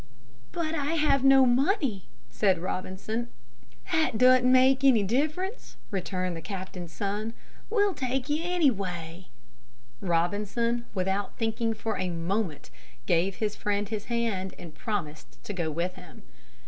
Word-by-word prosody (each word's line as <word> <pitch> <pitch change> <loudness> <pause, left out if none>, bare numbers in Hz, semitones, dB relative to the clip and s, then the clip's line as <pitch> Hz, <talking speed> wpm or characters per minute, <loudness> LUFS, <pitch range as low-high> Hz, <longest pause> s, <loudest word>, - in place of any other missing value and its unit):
"But 325 -2 -2
I 295 0 -1
have 295 -4 +3
no 270 -1 +7
money," 255 - +1 0.3
said 195 -3 +2
Robinson. 190 +6 -3 0.6
"That 315 -9 +2
doesn't 255 +1 +6
make 260 +1 +5
any 250 -6 +6
difference," 310 - -2
returned 185 -2 -2
the 165 - -6
captain's 185 -3 -6
son. 205 +4 -3 0.4
"We 420 -2 +3
will 400 - 0
take 260 -2 -2
you 300 +1 0
anyway." 190 - -1 0.7
Robinson, 205 +7 0
without 190 +2 -1
thinking 225 0 0
for 220 +1 -3
a 185 - -1
moment, 170 0 -2 0.3
gave 180 +2 +2
his 210 -1 -2
friend 205 0 -1
his 215 -2 -4
hand 225 -6 -1
and 170 -3 -10
promised 155 -5 -5
to 210 - -5
go 170 -4 -1
with 170 +4 -2
him. 180 -3 -14
210 Hz, 135 wpm, -28 LUFS, 185-260 Hz, 0.7 s, no